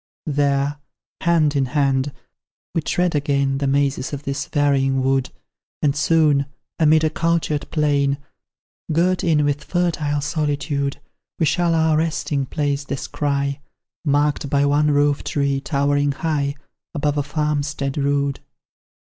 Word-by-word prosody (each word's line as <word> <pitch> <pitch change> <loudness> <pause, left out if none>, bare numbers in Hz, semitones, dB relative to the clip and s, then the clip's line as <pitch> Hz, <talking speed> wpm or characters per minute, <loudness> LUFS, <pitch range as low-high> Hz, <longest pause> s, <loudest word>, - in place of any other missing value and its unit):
There 145 0 0 0.4
hand 160 -3 +2
in 135 -2 +1
hand 135 0 +2 0.6
we 165 - +1
tread 180 +3 0
again 140 -2 +1
The 140 - 0
mazes 140 0 0
of 145 0 -5
this 140 +1 -3
varying 135 -2 +1
wood, 135 -1 +1 0.5
And 145 -2 +2
soon, 150 -2 +3 0.3
amid 155 0 +4
a 155 - +2
cultured 165 -3 0
plain, 140 -3 +1 0.7
Girt 180 +4 +2
in 155 -3 +3
with 145 +1 -1
fertile 155 -5 0
solitude, 145 -2 -1 0.4
We 160 - +2
shall 170 +2 +2
our 160 -1 +3
resting 155 -3 -1
place 145 0 -1
descry, 140 0 -2 0.4
Marked 145 -1 +1
by 140 0 +2
one 145 +1 +3
roof 145 0 +2
tree, 140 -1 0
towering 145 0 +1
high 145 -2 -1 0.4
Above 145 0 0
a - - +2
farmstead 145 -1 -2
rude. 140 -1 0
145 Hz, 130 wpm, -21 LUFS, 140-150 Hz, 0.7 s, amid